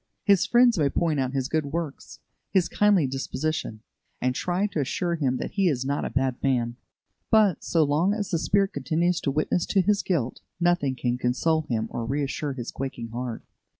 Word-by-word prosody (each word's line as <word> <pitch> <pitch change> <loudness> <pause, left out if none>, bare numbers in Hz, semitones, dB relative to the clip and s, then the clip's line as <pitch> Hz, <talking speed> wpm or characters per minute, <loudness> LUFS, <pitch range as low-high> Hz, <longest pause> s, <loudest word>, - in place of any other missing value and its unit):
His 195 -1 +4
friends 240 -3 +5
may 145 -2 +3
point 160 -1 0
out 130 0 -1
his 130 -1 0
good 155 -1 -1
works, 155 -1 -5 0.3
his 190 -3 +2
kindly 205 -6 +3
disposition, 135 -2 -3 0.4
and 125 0 0
try 180 +8 0
to 200 -6 -2
assure 170 +5 -1
him 135 -6 0
that - - -4
he 195 -2 +1
is 130 -4 -1
not 140 +1 -1
a - - -2
bad 130 -2 -1
man; 120 -3 0 0.5
but, 215 -6 +4
so 165 -2 +2
long 155 +6 +2
as 205 -2 -3
the 170 - +1
Spirit 195 +3 +1
continues 160 +6 0
to - - -1
witness 155 +4 0
to 200 - +2
his 205 +2 +2
guilt, 135 -10 -2 0.2
nothing 175 -6 +2
can 125 -1 -1
console 155 +6 +1
him 110 -2 0
or 120 - -3
reassure 140 +3 -2
his 125 -3 -6
quaking 130 -4 -5
heart. 120 0 -5
150 Hz, 190 wpm, -26 LUFS, 130-175 Hz, 0.5 s, friends